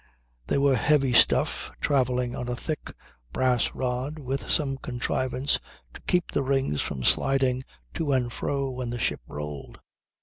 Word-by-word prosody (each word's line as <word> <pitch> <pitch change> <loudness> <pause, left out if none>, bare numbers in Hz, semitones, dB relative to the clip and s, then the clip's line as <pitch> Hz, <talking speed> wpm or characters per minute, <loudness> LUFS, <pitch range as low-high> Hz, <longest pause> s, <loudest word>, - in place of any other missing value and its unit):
They - - +1
were 140 -1 +4
heavy 135 +1 +3
stuff, - - +4
travelling 125 -3 +1
on 125 - -4
a 125 - -1
thick 155 +5 -4 0.4
brass 125 -2 +1
rod 130 +4 -2
with 135 -2 -4
some 135 -3 +1
contrivance 130 +1 -1 0.3
to - - -11
keep 180 -1 +1
the - - +1
rings 135 - +1
from 65 - -3
sliding 130 - +3 0.3
to 150 -3 -1
and 125 -3 +1
fro 140 -1 -1
when 125 -1 -4
the 120 - -3
ship - - -1
rolled. 75 -1 -7
130 Hz, 155 wpm, -27 LUFS, 125-140 Hz, 0.4 s, were